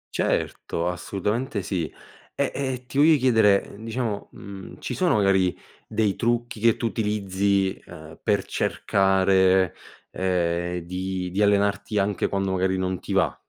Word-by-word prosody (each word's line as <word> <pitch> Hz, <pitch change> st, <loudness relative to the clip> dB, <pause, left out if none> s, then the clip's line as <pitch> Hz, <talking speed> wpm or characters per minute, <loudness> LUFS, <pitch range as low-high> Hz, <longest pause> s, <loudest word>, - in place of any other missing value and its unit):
Certo. 85 Hz, +1 st, -1 dB
Assolutamente 105 Hz, +5 st, -2 dB
sì. 85 Hz, -3 st, -2 dB, 0.4 s
E -, -, 0 dB
e 130 Hz, -2 st, -3 dB
ti 135 Hz, +3 st, -3 dB
voglio 155 Hz, +1 st, +6 dB
chiedere, 110 Hz, -6 st, +3 dB
diciamo, 115 Hz, -2 st, -3 dB
mhmm, 95 Hz, -2 st, -10 dB
ci -, -, -4 dB
sono -, -, +2 dB
magari 95 Hz, -3 st, +2 dB, 0.3 s
dei 105 Hz, -3 st, 0 dB
trucchi 120 Hz, -1 st, -1 dB
che 115 Hz, 0 st, +3 dB
tu -, -, -3 dB
utilizzi, 100 Hz, -3 st, 0 dB
ehm, 80 Hz, 0 st, -12 dB
per 100 Hz, -3 st, +1 dB
cercare, 95 Hz, -2 st, +2 dB, 0.4 s
ehm, 90 Hz, -1 st, -1 dB
di 90 Hz, 0 st, -3 dB
di 100 Hz, -, -1 dB
allenarti 100 Hz, +1 st, +2 dB
anche 100 Hz, 0 st, +1 dB
quando 95 Hz, -1 st, -1 dB
magari 95 Hz, 0 st, +1 dB
non 95 Hz, -1 st, -2 dB
ti -, -, -8 dB
va. -, -, +2 dB
100 Hz, 140 wpm, -24 LUFS, 95-110 Hz, 0.4 s, voglio